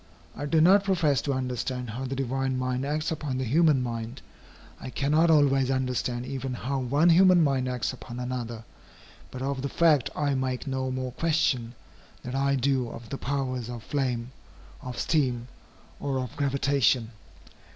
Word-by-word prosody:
I 145 - -4
do 160 +1 +3
not 195 +4 +6
profess 165 -8 +2
to 140 - -1
understand 125 -1 -3
how 130 +4 -4
the 135 +1 -3
divine 135 0 -1
mind 130 +1 -1
acts 155 +2 -1
upon 150 -5 -3
the 130 - -1
human 145 +1 +3
mind. 115 +1 -5 0.6
I - - -7
cannot 150 +5 +2
always 135 -4 +4
understand 125 -2 -1
even 130 -1 -4
how 135 +3 -2
one 140 +7 +3
human 180 0 +6
mind 135 -3 +1
acts 125 0 -2
upon 125 -1 -8
another. 120 -2 -4 0.7
But 130 0 -6
of 135 -1 -2
the 140 - -2
fact 155 -6 +3
I 145 -2 0
make 130 -1 -2
no 130 -1 -2
more 130 0 -3
question, 130 -6 0 0.5
than 125 - -6
I 140 +1 +1
do 130 -2 +1
of 115 -1 -10
the 135 - -5
powers 130 -3 -2
of 120 -3 -7
flame, 125 0 -2 0.5
of 125 -3 -7
steam, 125 -6 0 0.5
or 140 -2 -2
of 125 -3 -4
gravitation. 135 -4 +1
130 Hz, 165 wpm, -27 LUFS, 125-140 Hz, 0.7 s, not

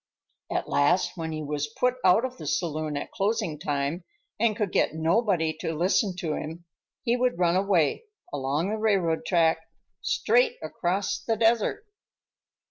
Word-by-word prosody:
At - - -1
last, 145 +6 +2
when 165 -2 -4
he 155 -1 -4
was 150 0 -2
put 250 0 +2
out 225 +7 +5
of 255 0 -6
the - - -8
saloon 155 -3 -1
at - - -5
closing 200 -6 -1
time, 145 +3 -2 0.4
and 220 -1 +2
could 210 -4 -1
get - - +1
nobody 165 0 +1
to 165 0 -3
listen 185 +3 +1
to 170 -5 -2
him, 165 +3 -6 0.4
he 240 -1 +2
would 250 -5 +1
run 175 -1 +2
away—along 185 - 0
the 220 - -2
railroad 190 -7 +1
track, 165 -3 +3 0.4
straight - - +2
across 190 +3 -1
the 225 - 0
desert. 230 - +2
180 Hz, 150 wpm, -26 LUFS, 160-220 Hz, 0.4 s, out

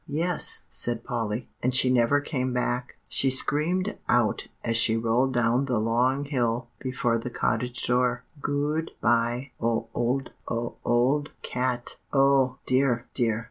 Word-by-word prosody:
"Yes," 165 +4 +1
said 120 -1 -4
Polly; 115 -2 -3
"and 125 +1 +1
she 130 0 +5
never 125 +3 +3
came 130 -4 -2
back. 125 0 -2
She 135 - +2
screamed 170 +9 +1
out 120 -3 +2 0.2
as 115 -1 0
she 115 0 +4
rolled 115 +4 +1
down 120 +2 +2
the 125 -3 0
long 125 +5 +1
hill 120 -4 -1
before 125 -3 0
the 120 +2 -5
cottage 125 +1 -1
door, 125 0 +1 0.2
'Goo 145 +3 0
d 165 - -11
by 120 +3 +1
o 115 0 0
old 125 +3 -1 0.2
o 115 +1 -2
o 125 +5 +3
ld 145 +1 -9
cat.'" 125 -1 -2
"Oh, 135 -2 +3
dear, 130 -2 +2
dear!" 115 -4 +1
125 Hz, 150 wpm, -26 LUFS, 120-135 Hz, 0.2 s, she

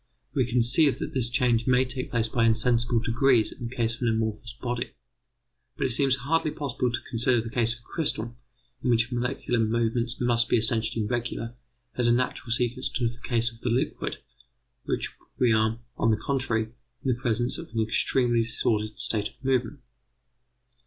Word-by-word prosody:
We 130 -4 +1
conceive 125 +5 +3
that - - -5
this 125 -3 +1
change 120 -1 +2
may 130 0 +4
take 130 0 -4
place 115 -2 0
by 115 0 +1
insensible 115 +1 +2
degrees 115 0 +3
in 120 - -6
the 125 - -9
case 115 -2 0
of 120 - -10
an 120 - +1
amorphous 110 +1 -1
body. 120 -1 -3 0.8
But 140 - 0
it 130 - +1
seems 135 +2 +3
hardly 155 +5 0
possible 130 -4 -2
to 120 - -1
consider 120 +1 +2
the 115 0 -5
case 115 -1 +1
of 120 - -16
a - - -26
crystal, 120 -7 -2 0.5
in - - +1
which 115 +1 +3
molecular 125 0 -1
movements 115 +2 0
must 120 -1 +2
be - - +4
essentially 110 0 +1
regular, 120 0 -3 0.4
as 120 -1 +3
a - - +5
natural 125 0 0
sequence 125 +2 0
to 120 -3 0
the 120 +1 -11
case 115 -1 0
of 115 0 -17
the 125 - -1
liquid 120 +3 -1 0.7
where - - 0 0.4
we 120 -3 +4
are, 110 +1 +2 0.2
on - - +2
the 110 - +3
contrary, 115 -3 -1 0.4
in 130 -3 +2
presence 120 -1 -1
of - - -8
an 115 - -3
extremely 120 +2 +2
disordered 110 0 -1
state 110 -5 -1
of - - -24
movement. 130 +1 0
120 Hz, 180 wpm, -27 LUFS, 115-125 Hz, 0.8 s, a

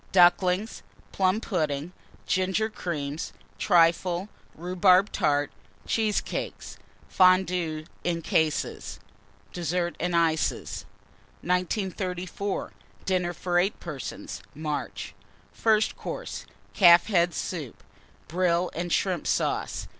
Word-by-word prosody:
Ducklings. 185 +3 +4 0.3
Plum 190 +2 +2
pudding. 155 -6 -2 0.3
Ginger 190 +4 +1
Cream. 150 -7 -4 0.4
Trifle. 175 +1 +3 0.3
Rhubarb 185 +3 +3
Tart. 145 -5 +1 0.3
Cheesecakes. 215 -2 -2 0.3
Fondues, 180 -4 +3 0.2
in 170 -1 -1
cases. 155 -1 -1 0.5
DESSERT 175 0 -1
AND 175 0 -1
ICES. 165 -2 0 0.6
1934. 185 +1 -2 0.3
DINNER 180 -2 0
FOR 175 +1 0
8 195 +4 0
PERSONS 150 -7 -6
(March). 150 0 -4 0.4
FIRST 220 -1 +2
COURSE. - - -6 0.3
Calf's 175 -3 +7
Head 175 -5 +2
Soup. 155 -9 -5 0.4
Brill 175 +1 +1
and 175 +1 -3
Shrimp 185 -2 0
Sauce. - - -1
180 Hz, 90 wpm, -27 LUFS, 170-185 Hz, 0.6 s, Calf's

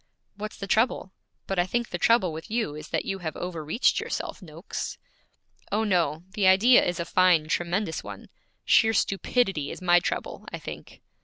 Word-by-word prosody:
'What's 210 +1 -7
the 200 - -5
trouble? 215 -2 +1 0.3
But 195 -2 -2
I 175 - +2
think 235 +4 -1
the - - -4
trouble 230 -8 +3
with 160 +1 -8
you 225 -9 -1
is 155 +1 -8
that - - -1
you 195 - -3
have 160 -3 -5
overreached 175 - 0
yourself, - - -4
Noakes.' 165 +1 -6 0.7
'Oh, 215 +2 +1
no; 170 -6 +1
the 200 -2 +1
idea 215 +7 +6
is 175 -1 -2
a 170 - -2
fine, 180 -4 +3
tremendous 175 +2 -1
one. - - -10 0.4
Sheer 225 -1 +4
stupidity 195 - 0
is - - -7
my 175 -1 +4
trouble, 175 - -4
I - - -4
think.' - - -10
185 Hz, 175 wpm, -26 LUFS, 165-215 Hz, 0.7 s, idea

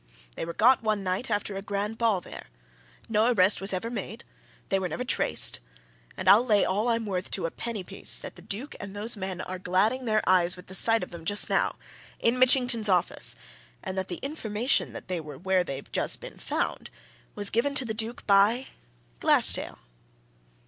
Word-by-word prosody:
They - - -4
were 170 - -6
got 250 +7 +4
one 215 -3 -1
night 185 +7 -2
after 205 -1 -2
a 195 - -4
grand 205 +2 -4
ball 220 -6 +1
there; - - -11 0.6
no 225 +2 +2
arrest 195 -3 +3
was 195 - +1
ever 195 +5 -3
made, 235 -1 -6 0.5
they 195 - +1
were 185 -1 -3
never 250 - -4
traced. 245 - +3 0.6
And - - -5
I'll 215 +4 +7
lay 210 -5 +3
all 205 +5 -1
I'm 230 -1 0
worth 185 -2 -3
to 185 - -2
a 165 - -3
penny 225 -5 -5
piece 195 +2 +4
that - - -7
the 175 - -14
Duke 215 - -6
and 200 0 -8
those 220 +4 +1
men 190 -2 -5
are 185 0 -6
gladding 205 +8 0
their 215 -2 0
eyes 180 -1 +3
with 180 - -12
the 190 - -11
sight 225 +3 +3
of - - -8
them 170 -1 -9
just 205 +5 0
now! - - +1 0.4
in 235 +2 +1
Mitchington's 245 -4 +4
office 180 -2 +1 0.5
and 190 - -5
that 190 0 -3
the 175 - -3
information 245 -4 -1
that - - -9
they 180 -2 -3
were 150 -3 -10
where 185 +2 +1
they've 140 -5 -7
just - - -1
been - - -11
found - - -3 0.5
was 205 -1 -2
given 280 +5 0
to 270 - +2
the 220 - -3
Duke 225 +2 -3
by 210 +6 +3 0.5
Glassdale!" - - +5
205 Hz, 195 wpm, -26 LUFS, 185-230 Hz, 0.6 s, I'll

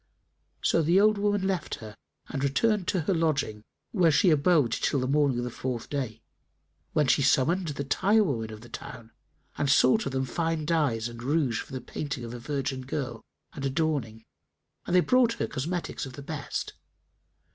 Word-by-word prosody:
So 165 - +3
the 170 +5 +4
old 215 0 +4
woman 205 -1 +1
left 190 -3 -1
her 110 -1 -10 0.3
and 135 0 -3
returned 195 +7 +1
to 185 - +1
her 175 +5 0
lodging, 150 -10 0 0.3
where 180 -6 +4
she 170 +4 +4
abode 150 -4 +3
till 140 - 0
the 130 - -1
morning 140 -2 +2
of 120 - -1
the 125 - -4
fourth 125 -1 -4
day, 120 -6 -3 0.7
when 150 -2 +3
she 135 - +3
summoned 155 +7 +2
the 140 -2 -3
tirewomen 145 - +1
of 110 0 -9
the 120 - -12
town 115 -1 -9 0.5
and 145 - +1
sought 135 -2 +4
of - - -3
them 130 0 -1
fine 165 +3 -1
dyes 145 -9 +1
and 120 0 -9
rouge 135 -3 +1
for - - -12
the 130 - -4
painting 135 +1 -5
of 115 - -7
a 120 - -6
virgin 135 0 -3
girl 130 -3 -4 0.3
and 140 - -7
adorning; 135 -6 -1 0.6
and 175 - +1
they 180 - +7
brought 250 +2 +3
her - - -2
cosmetics 165 +1 -3
of 130 - -10
the 140 - -9
best. 145 -2 -4
140 Hz, 185 wpm, -28 LUFS, 125-165 Hz, 0.7 s, they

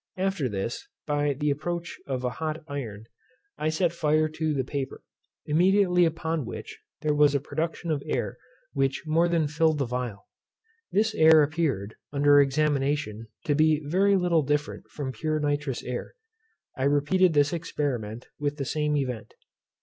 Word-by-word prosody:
After 185 -8 0
this, 105 +3 -4 0.2
by 145 -1 +1
the 145 +2 0
approach 170 +4 -4
of 130 -2 -2
hot 155 +5 -3
iron, 115 -8 -6 0.5
I 155 - +1
set 165 +2 +1
fire 155 -1 +2
to 155 0 -2
the 135 -3 0
paper; 135 +1 -5 0.4
immediately 180 +2 +4
upon 165 -1 -1
which - - -8 0.2
there 150 -1 +1
was 145 -1 +4
a - - +3
production 160 +4 -3
of 145 -2 0
air - - -2 0.3
which 135 0 0
more 165 +2 +3
than 165 -3 +1
filled 160 +1 +2
the 140 - 0
phial. 120 -5 -4 0.7
This 220 +2 +2
air 160 -5 +7
appeared, 145 - -1
upon 145 0 0
examination, 140 -5 0 0.2
to 150 - +2
be 155 +1 +4
very 195 +6 +3
little 175 -3 +3
different 145 +1 -2
from 140 -3 -4
pure 155 +6 -1
nitrous 145 -3 -1
air. 125 - -5 0.6
I 130 - -1
repeated 150 +6 +3
this 145 +2 +3
experiment 130 -9 -3
with 145 0 -1
the 140 - -3
same 150 +1 0
event. 125 -5 -4
150 Hz, 155 wpm, -27 LUFS, 135-160 Hz, 0.7 s, air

